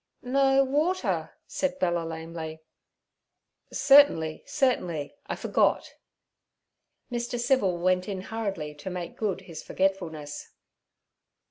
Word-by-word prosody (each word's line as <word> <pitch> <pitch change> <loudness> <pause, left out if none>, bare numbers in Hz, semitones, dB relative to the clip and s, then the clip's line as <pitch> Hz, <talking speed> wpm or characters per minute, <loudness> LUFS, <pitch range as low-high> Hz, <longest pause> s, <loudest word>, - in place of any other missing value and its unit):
'No; 270 +1 +4
water' 305 +8 0
said 280 -1 -2
Bella 175 -6 +1
lamely. 160 -1 -6 1.1
'Certainly, 270 - +5
certainly; 175 - 0
I - - -2
forgot.' - - +1 1.2
Mr. 240 0 -2
Civil 235 -8 +2
went 185 +2 +1
in 190 -2 -3
hurriedly 195 -8 -4
to 150 +6 -7
make 180 -2 -5
good 210 -4 -2
his 165 -3 -9
forgetfulness. 160 -6 -2
185 Hz, 100 wpm, -27 LUFS, 165-255 Hz, 1.2 s, Certainly